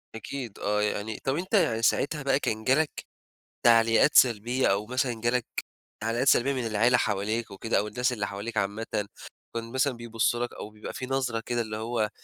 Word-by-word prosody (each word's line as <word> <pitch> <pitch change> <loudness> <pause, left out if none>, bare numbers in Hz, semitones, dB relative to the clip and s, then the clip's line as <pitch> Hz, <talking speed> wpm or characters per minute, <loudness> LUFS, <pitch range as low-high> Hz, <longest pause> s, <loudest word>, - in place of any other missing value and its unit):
أكيد 120 0 -6
آه 105 +1 0
يعني، 105 +1 -2
طَب 135 +1 0
أنتَ 185 +5 -5
يعني 115 - +3
ساعتها 145 +5 +1
بقى 135 0 +2
كان 110 -4 -2
جَالك 145 +5 +1 0.6
تعليقات 115 +4 +5
سلبية 120 +2 +4
أو 100 +2 +1
مثلًا 125 -2 -1
جالك 120 0 +1 0.6
تعليقات 115 +5 0
سلبية 135 +2 +4
من 125 -3 -2
العيلة 115 +3 +3
حواليك 110 +1 -1
وكده، 105 +4 -1
أو 105 - 0
الناس 125 +4 0
اللي 105 -4 -2
حواليك 105 +3 -6
عامةً، 100 +3 -1 0.7
كان 115 0 -4
مثلًا 130 +1 +1
بيبصوا 120 +1 -1
لك - - -11
أو - - -7
بيبقى 105 0 -9
في 130 - -5
نظرة 130 -3 -1
كده 120 -1 0
اللي 110 -1 -4
هو 110 -1 -1
115 Hz, 180 wpm, -27 LUFS, 110-130 Hz, 0.7 s, تعليقات